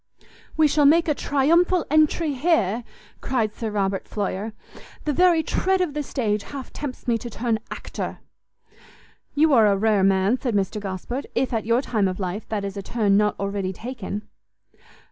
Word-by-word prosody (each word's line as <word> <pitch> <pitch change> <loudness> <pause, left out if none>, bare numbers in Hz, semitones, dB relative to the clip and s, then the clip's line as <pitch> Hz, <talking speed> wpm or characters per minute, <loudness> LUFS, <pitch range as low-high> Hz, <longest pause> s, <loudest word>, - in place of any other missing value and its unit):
"We 315 -1 +5
shall 290 0 +4
make 330 +3 +5
a 300 - +3
triumphal 335 +6 +2
entry 310 0 +3
here," 250 - +1 0.4
cried 225 -5 0
Sir 225 0 -4
Robert 195 -2 -1
Floyer; 205 +1 -3 0.5
"the 300 - +1
very 345 0 +4
tread 380 +3 +1
of 355 -5 0
the 300 - -2
stage 220 -7 -1
half 270 +3 -8
tempts 275 -4 -6
me 230 -1 +2
to 240 - -7
turn 230 0 -1
actor." - - -5 1.2
"You 305 0 +4
are 225 -4 +6
a 200 -1 +3
rare 210 -1 +2
man," 195 +5 +3
said 245 -5 -1
Mr 200 +1 0
Gosport, 200 +7 -5
"if, 260 - 0
at 220 -2 -2
your 235 +3 +2
time 215 -7 +1
of 185 +1 -4
life, 190 +3 -4
that 205 -2 -2
is 195 0 -5
a 200 - -4
turn 205 -1 +1
not 210 0 +2
already 200 -1 -2
taken." 220 -2 -6
230 Hz, 175 wpm, -23 LUFS, 200-290 Hz, 1.2 s, are